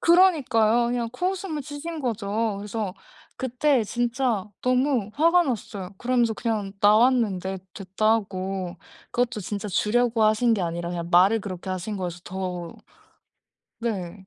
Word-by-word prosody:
그러니까요. 260 - +4
그냥 240 -1 -1
코웃음을 360 -1 -2
치신 305 +4 -6
거죠. 220 -3 -1
그래서 205 -1 -4 0.4
그때 260 0 +1
진짜 240 -2 0 0.2
너무 255 -4 +1
화가 335 +7 +4
났어요. 210 - -4
그러면서 240 -2 +2
그냥 215 -4 -2
나왔는데 210 -4 +3 0.2
'됐다.' 195 +3 0
하고. 190 -4 -2 0.3
그것도 245 -3 0
진짜 205 +2 -4
주려고 225 +4 +2
하신 220 +2 +3
게 195 - -1
아니라 170 0 -3
그냥 170 -1 -4
말을 190 +6 +5
그렇게 185 -1 -6
하신 185 +3 -3
거여서 175 -1 -4
더 180 -2 -5 1.1
네. 190 -4 -4
220 Hz, 300 characters per minute, -25 LUFS, 190-245 Hz, 1.1 s, 말을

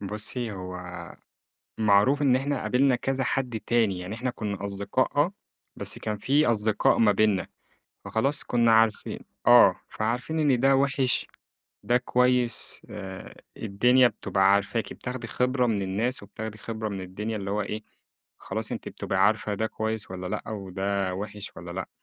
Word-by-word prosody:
بُصّي، 105 +3 -3
هو 90 -1 -6 1.0
معروف 110 +7 +4
إن 130 -3 +4
إحنا 140 +1 -1
قابلنا 130 0 +3
كذا 135 +2 -1
حد 125 -4 -1
تاني، 110 -6 +2
يعني 90 +4 -6
إحنا 125 +2 -2
كنّا 100 -4 -5
أصدقاء 100 +7 -1
آه، 150 +6 +3 0.4
بس - - -2
كان 105 -1 -3
في 140 +7 +2
أصدقاء 110 -2 +2
ما 110 -2 +5
بيننا، 100 -1 +2 0.6
فخلاص 140 +6 +1
كنّا 120 -1 +3
عارفين 110 -1 +2 0.3
آه، - - +7
فعارفين 125 +8 -2
إن 140 -6 +3
ده 135 +1 +5
وِحش، 135 -1 +1 0.6
ده 120 - +2
كويس 125 -1 +2
آآ، 95 -3 -8 0.2
الدنيا 125 +5 +4
بتبقى 95 -4 +2
عارفاكِ، 100 +3 0
بتاخدي 125 -1 -6
خِبرة 125 0 +1
من 105 -4 0
الناس 105 +7 -1
وبتاخدي 105 +1 -7
خِبرة 110 0 -4
من 100 -2 -5
الدنيا، 105 +4 -4
اللي 100 -1 -4
هو 105 +1 0
إيه، 105 +2 -5 0.6
خلاص - - -4
أنتِ - - -5
بتبقي - - -3
عارفة 105 - 0
ده 110 +2 -1
كويس 110 -2 -3
والَّا 90 0 -5
لأ، 105 +3 -3
وده 95 -1 -2
وِحش 105 +2 -6
والّا 85 +1 -8
لأ، 95 +1 -5
110 Hz, 155 wpm, -26 LUFS, 100-125 Hz, 1.0 s, آه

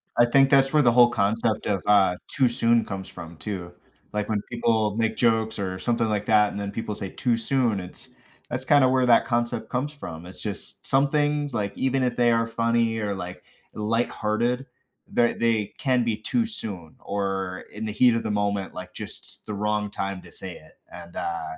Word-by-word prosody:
I 120 - +6
think 135 +3 +4
that's 135 -1 +5
where 150 - +5
the 120 -3 +5
whole 120 0 +6
concept 110 0 0
of, 100 -3 0
uh, 100 -3 +4
"too 130 -3 +2
soon" 115 0 +2
comes 95 -1 -6
from, 85 -2 -10
too 90 -4 -6 0.4
like 105 +1 -2
when 105 -2 0
people 110 -3 +1
make 115 -1 0
jokes 110 -2 +2
or 95 -1 -2
something 115 +3 0
like 105 -1 -1
that, 105 -1 +4
and 100 - -5
then 100 0 -3
people 105 -1 -4
say, 95 - -5
"Too 120 -2 0
soon," 115 -4 +1
it's 90 - -10 0.4
that's 125 +2 -3
kinda 145 -2 +5
where 130 -1 +3
that 120 - +5
concept 120 -2 -1
comes 135 +4 -1
from. 85 - -8
It's 90 - -11
just 105 -3 -7
some 135 +1 +3
things, 145 -2 0
like 100 -3 -2
even 130 0 +1
if 125 -1 0
they 120 -1 +4
are 115 0 +2
funny 115 0 +1
or, 105 -2 -1
like, 90 -1 -7 0.3
lighthearted, 115 +3 0 0.5
ther 120 -1 +3
they 115 -3 0
can 125 -4 +1
be 115 -2 +1
too 230 - 0
soon 100 - -6
or 95 -2 -3
in 105 +1 -6
the 110 - -2
heat 120 +2 +4
of 115 - -1
the 110 - -2
moment, 100 -2 -1
like, 90 0 -8
just - - -10
the 105 - -5
wrong 105 0 -1
time 95 -1 -4
to - - -15
say 95 -2 -7
it, 80 - -20
and, 85 -1 -11
uh 85 -1 -2
110 Hz, 205 wpm, -25 LUFS, 100-120 Hz, 0.5 s, I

